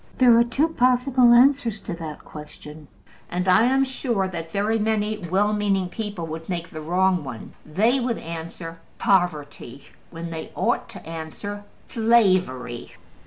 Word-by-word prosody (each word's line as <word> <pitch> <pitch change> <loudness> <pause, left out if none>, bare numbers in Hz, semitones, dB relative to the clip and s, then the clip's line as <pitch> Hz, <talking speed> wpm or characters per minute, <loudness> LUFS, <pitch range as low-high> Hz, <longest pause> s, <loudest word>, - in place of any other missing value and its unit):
There 245 -3 +6
are - - +6
two 270 +7 0
possible 250 -2 +3
answers 240 -3 +4
to - - -5
that 160 -3 -8
question, 150 0 -11 0.4
and 180 +1 -2
I 220 +5 +5
am 265 +2 +3
sure 240 -7 -1
that 165 -3 -6
very 210 +4 0
many 215 0 0
well 195 +3 +1
meaning 200 -3 0
people 205 -5 -5
would 160 +1 -7
make 170 -2 -4
the 155 - -7
wrong 180 +1 +1
one. 125 -5 -8
They 220 - +2
would 240 -2 -1
answer 165 0 -7 0.2
POVERTY, 150 -8 -1 0.2
when 165 0 -7
they 160 -1 -6
ought - - 0
to - - -11
answer 165 +6 -7 0.2
SLAVERY. 185 - +1
190 Hz, 150 wpm, -23 LUFS, 165-230 Hz, 0.4 s, There